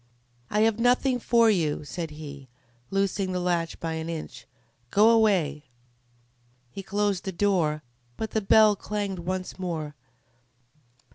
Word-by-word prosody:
"I 210 Hz, -, +1 dB
have 220 Hz, 0 st, +2 dB
nothing 250 Hz, +1 st, +2 dB
for 230 Hz, -1 st, +4 dB
you," 160 Hz, -7 st, 0 dB
said 165 Hz, +1 st, -5 dB
he, 145 Hz, -3 st, -10 dB, 0.4 s
loosing 195 Hz, -1 st, 0 dB
the 180 Hz, -, -1 dB
latch 175 Hz, -2 st, -1 dB
by 165 Hz, -1 st, -3 dB
an 160 Hz, +1 st, -4 dB
inch. 165 Hz, -2 st, -7 dB, 0.4 s
"Go 215 Hz, -, +5 dB
away!" 180 Hz, -10 st, +2 dB, 1.1 s
He 195 Hz, -, -7 dB
closed 200 Hz, -1 st, -1 dB
the 190 Hz, -, -3 dB
door, 170 Hz, -5 st, +1 dB, 0.3 s
but 220 Hz, -, -4 dB
the 220 Hz, -, 0 dB
bell 210 Hz, +1 st, +5 dB
clanged 200 Hz, -2 st, -4 dB
once 185 Hz, +2 st, -4 dB
more. 160 Hz, -5 st, -4 dB
185 Hz, 135 wpm, -26 LUFS, 165-210 Hz, 1.1 s, Go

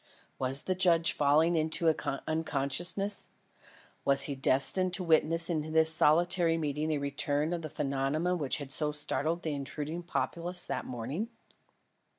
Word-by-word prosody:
Was 135 Hz, +1 st, +2 dB
the 185 Hz, -, -1 dB
judge 175 Hz, -3 st, +3 dB
falling 150 Hz, +3 st, +3 dB
again 160 Hz, -, +2 dB
into 160 Hz, -3 st, 0 dB
unconsciousness? 165 Hz, +6 st, +1 dB, 0.7 s
Was 140 Hz, 0 st, +2 dB
he 145 Hz, -, -3 dB
destined 140 Hz, +7 st, +1 dB
to 185 Hz, -, -3 dB
witness 165 Hz, 0 st, +2 dB
in 155 Hz, -2 st, -3 dB
this 160 Hz, 0 st, +4 dB
solitary 170 Hz, +2 st, +3 dB
meeting 150 Hz, 0 st, -2 dB
a 155 Hz, -, 0 dB
return 145 Hz, +2 st, -1 dB
of 170 Hz, -, -3 dB
the 155 Hz, -, -6 dB
phenomenon 145 Hz, +6 st, -2 dB
which 140 Hz, -4 st, 0 dB
had 140 Hz, -2 st, -7 dB
so 150 Hz, +1 st, +2 dB
startled 155 Hz, +3 st, -2 dB
the 155 Hz, -, -2 dB
intruding 145 Hz, +4 st, -5 dB
populace 175 Hz, +1 st, -1 dB
that -, -, -4 dB
morning? 130 Hz, -, -5 dB
155 Hz, 150 wpm, -30 LUFS, 145-170 Hz, 0.7 s, this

